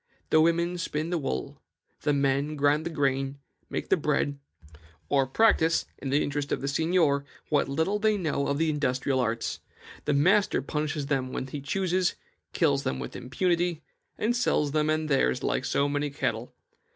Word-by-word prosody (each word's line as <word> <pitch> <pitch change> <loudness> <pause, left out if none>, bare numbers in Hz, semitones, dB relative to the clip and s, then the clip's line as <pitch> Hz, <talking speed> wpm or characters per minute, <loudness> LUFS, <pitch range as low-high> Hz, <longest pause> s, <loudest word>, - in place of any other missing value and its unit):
The 155 - +6
women 170 +2 +2
spin 160 0 -2
the 175 - +1
wool; 65 - -4 0.4
the 150 - +1
men 140 +1 +1
grind 145 +2 +2
the - - -2
grain, 135 -3 0 0.3
make - - -4
the - - +5
bread, 145 -1 0 0.7
or 135 -2 +3
practise, 165 - +3
in 135 - -4
the 140 +2 +2
interest 145 0 -3
of - - 0
the 140 - -3
seignior, 160 -1 +2 0.3
what 145 -3 +2
little 160 +9 0
they 215 0 +2
know 150 -6 -1
of 140 - 0
the 160 0 +2
industrial 135 -2 0
arts. 115 -2 -1 0.5
The 145 - +1
master 190 +8 +3
punishes 150 0 -2
them 135 -2 -1
when - - -3
he 140 +2 -6
chooses, 185 +4 0 0.4
kills 145 -5 +2
them 65 - -2
with 65 - -6
impunity, 170 +6 0 0.3
and 235 +3 +1
sells 150 -11 +1
them 155 0 +1
and 155 0 0
theirs 135 - +1
like - - 0
so 140 - +1
many 145 +1 -1
cattle. 125 -4 -3
145 Hz, 175 wpm, -27 LUFS, 140-165 Hz, 0.7 s, The